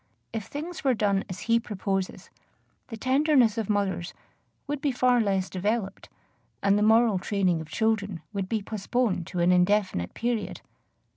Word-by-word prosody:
If 220 Hz, -3 st, -3 dB
things 320 Hz, +4 st, -6 dB
were 265 Hz, -3 st, +3 dB
done 200 Hz, -2 st, +1 dB
as 185 Hz, -, -6 dB
he 230 Hz, 0 st, +3 dB
proposes, 195 Hz, -3 st, -3 dB, 0.6 s
the 225 Hz, -, -7 dB
tenderness 260 Hz, -2 st, +3 dB
of 215 Hz, -, -3 dB
mothers 190 Hz, -4 st, -1 dB, 0.5 s
would 290 Hz, -1 st, -3 dB
be 285 Hz, -, +1 dB
far 250 Hz, -1 st, +3 dB
less 195 Hz, -3 st, 0 dB
developed, 200 Hz, +1 st, -2 dB, 0.5 s
and 200 Hz, 0 st, +4 dB
the 205 Hz, -, +2 dB
moral 220 Hz, -2 st, +4 dB
training 185 Hz, -4 st, 0 dB
of 160 Hz, -, -10 dB
children 205 Hz, -3 st, -1 dB
would 195 Hz, -2 st, -3 dB
be 220 Hz, -3 st, -1 dB
postponed 215 Hz, -3 st, -1 dB
to 180 Hz, -1 st, -2 dB
an 175 Hz, +1 st, +4 dB
indefinite 180 Hz, -, +2 dB
period. 235 Hz, -2 st, -2 dB
210 Hz, 155 wpm, -27 LUFS, 190-235 Hz, 0.6 s, and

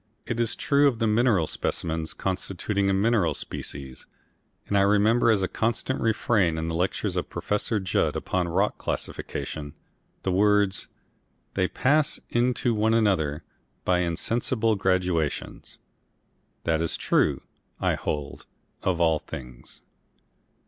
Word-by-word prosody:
It 120 Hz, -, -3 dB
is 115 Hz, -1 st, +1 dB
true 145 Hz, 0 st, +3 dB
of 130 Hz, -5 st, +1 dB
the 115 Hz, -, 0 dB
mineral 110 Hz, -5 st, +3 dB
specimens 80 Hz, 0 st, -2 dB
constituting 100 Hz, +1 st, -1 dB
a -, -, +3 dB
mineral 95 Hz, -6 st, +2 dB
species, 65 Hz, -2 st, -7 dB, 0.6 s
and 100 Hz, -, -1 dB
I 100 Hz, -, +5 dB
remember 105 Hz, +4 st, +4 dB
as 105 Hz, -4 st, +3 dB
a -, -, +1 dB
constant 115 Hz, +5 st, -1 dB
refrain 105 Hz, -6 st, +2 dB
in 80 Hz, +1 st, -2 dB
the -, -, -3 dB
lectures 90 Hz, +3 st, -1 dB
of -, -, -2 dB
Prof. 105 Hz, 0 st, -1 dB
Judd 90 Hz, -, +1 dB
upon 90 Hz, -2 st, -1 dB
rock 95 Hz, +5 st, 0 dB
classification, 75 Hz, -2 st, -4 dB, 0.5 s
the 95 Hz, -, 0 dB
words 100 Hz, 0 st, +2 dB, 0.7 s
"they 90 Hz, -, +1 dB
pass 145 Hz, +7 st, +2 dB
into 120 Hz, 0 st, +2 dB
one 110 Hz, +1 st, +2 dB
another 85 Hz, -9 st, +1 dB, 0.4 s
by 90 Hz, -1 st, +3 dB
insensible 110 Hz, +6 st, +1 dB
gradations." 90 Hz, -5 st, -1 dB, 0.9 s
That 80 Hz, -1 st, +1 dB
is 85 Hz, -, +1 dB
true, -, -, +1 dB, 0.4 s
I -, -, +2 dB
hold, 75 Hz, -2 st, -4 dB, 0.3 s
of 90 Hz, -2 st, 0 dB
all 80 Hz, -2 st, +3 dB
things. 60 Hz, -4 st, -10 dB
95 Hz, 130 wpm, -26 LUFS, 85-115 Hz, 0.9 s, I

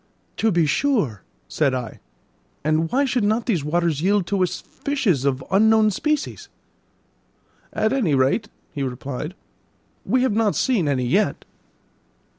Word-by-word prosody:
"To 225 Hz, -, +2 dB
be 170 Hz, -3 st, +3 dB
sure," 150 Hz, -, 0 dB, 0.3 s
said 140 Hz, -, 0 dB
I; 125 Hz, -3 st, -5 dB, 0.6 s
"and 155 Hz, +2 st, +1 dB
why 275 Hz, +3 st, +2 dB
should 245 Hz, -4 st, 0 dB
not 220 Hz, +3 st, +1 dB
these 185 Hz, -, 0 dB
waters 160 Hz, -1 st, 0 dB
yield 195 Hz, +1 st, +2 dB
to 195 Hz, +1 st, -1 dB
us 180 Hz, -, 0 dB
fishes 215 Hz, -, -1 dB
of 135 Hz, -1 st, 0 dB
unknown 220 Hz, +2 st, +4 dB
species?" 300 Hz, +8 st, -2 dB, 1.2 s
"At 220 Hz, +3 st, 0 dB
any 205 Hz, -, +1 dB
rate," 135 Hz, -, +1 dB, 0.2 s
he 145 Hz, -, -4 dB
replied, 135 Hz, +5 st, -5 dB, 0.7 s
"we 255 Hz, 0 st, +1 dB
have 260 Hz, -, +1 dB
not 215 Hz, -1 st, +1 dB
seen 220 Hz, -, +1 dB
any 130 Hz, -3 st, 0 dB
yet." 195 Hz, +13 st, 0 dB
185 Hz, 140 wpm, -22 LUFS, 145-220 Hz, 1.2 s, unknown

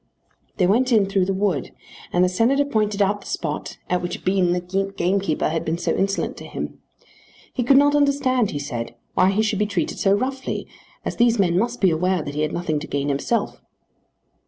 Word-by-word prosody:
They 185 Hz, -, +3 dB
went 245 Hz, +7 st, +2 dB
in 215 Hz, -4 st, +5 dB
through 195 Hz, -1 st, +1 dB
the 195 Hz, -, -1 dB
wood, 190 Hz, -8 st, -1 dB, 0.4 s
and 175 Hz, -, +3 dB
the -, -, +4 dB
Senator 235 Hz, +10 st, +2 dB
pointed 210 Hz, -6 st, +1 dB
out 205 Hz, +1 st, 0 dB
the -, -, -12 dB
spot 150 Hz, -3 st, -4 dB
at 180 Hz, 0 st, 0 dB
which 175 Hz, -, -5 dB
Bean 185 Hz, -2 st, +2 dB
the 185 Hz, +3 st, -1 dB
gamekeeper 180 Hz, -4 st, +1 dB
had 160 Hz, +1 st, -1 dB
been 160 Hz, +1 st, -1 dB
so 175 Hz, -, -1 dB
insolent 195 Hz, +1 st, -1 dB
to -, -, -9 dB
him. -, -, -6 dB, 0.7 s
He 255 Hz, -, -1 dB
could 265 Hz, +3 st, +5 dB
not 290 Hz, +1 st, +5 dB
understand, 275 Hz, -5 st, +2 dB
he -, -, -4 dB
said, 120 Hz, -5 st, -5 dB, 0.2 s
why 185 Hz, -, +4 dB
he 205 Hz, +3 st, +1 dB
should 215 Hz, -2 st, 0 dB
be 210 Hz, -, +1 dB
treated 190 Hz, -6 st, -2 dB
so 195 Hz, -, +3 dB
roughly, 260 Hz, +5 st, -2 dB, 0.4 s
as -, -, -3 dB
these 235 Hz, -1 st, +4 dB
men 180 Hz, -4 st, +2 dB
must 235 Hz, +6 st, 0 dB
be 190 Hz, -3 st, +5 dB
aware 180 Hz, +1 st, +1 dB
that 145 Hz, -, -6 dB
he 150 Hz, -, -2 dB
had 155 Hz, 0 st, 0 dB
nothing 165 Hz, -3 st, -1 dB
to 155 Hz, -, -8 dB
gain 140 Hz, 0 st, -2 dB
himself. 145 Hz, +12 st, -1 dB
195 Hz, 205 wpm, -22 LUFS, 175-225 Hz, 0.7 s, in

